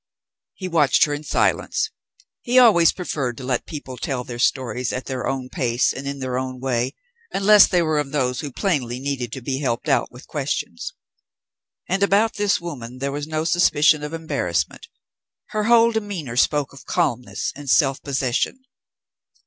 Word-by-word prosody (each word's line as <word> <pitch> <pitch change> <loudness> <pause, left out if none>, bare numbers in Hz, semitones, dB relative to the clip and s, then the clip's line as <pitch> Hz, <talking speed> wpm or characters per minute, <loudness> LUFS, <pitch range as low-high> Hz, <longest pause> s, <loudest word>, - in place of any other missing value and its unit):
He 185 - -5
watched 160 -6 +4
her 150 - -3
in 145 +1 -4
silence. - - 0 0.5
He 250 0 +1
always 205 -10 +7
preferred 135 -9 -3
to - - -8
let 125 -1 -2
people 140 -5 -7
tell 130 -2 -3
their 120 -1 -8
stories 125 -1 0
at 125 - -4
their 130 -2 -3
own 130 -1 -2
pace 120 -1 0
and 140 +1 -6
in 140 0 -3
their 130 -1 -2
own 130 -1 -5
way, 130 +1 -1 0.4
unless 205 +1 +6
they 175 -2 +2
were 155 -2 +1
of 140 -2 -3
those 130 -4 0
who 145 -3 -5
plainly 130 -7 -1
needed 130 -4 -3
to 130 - -6
be 135 +1 -2
helped 125 -5 -2
out - - +1
with - - -13
questions. - - -3 0.9
And 190 +2 0
about 200 +3 +3
this 205 -1 +1
woman 130 -8 -7
there 140 +2 -2
was 145 +1 -4
no 155 0 -1
suspicion 155 -3 +4
of 150 0 -5
embarrassment; 145 - -2 0.6
her 215 -1 -1
whole 235 0 +5
demeanour 200 - -4
spoke 145 +2 +1
of 140 - -14
calmness 130 -9 -1
and 145 -1 -8
self 135 -1 +3
possession. 135 - -1
140 Hz, 175 wpm, -22 LUFS, 130-170 Hz, 0.9 s, always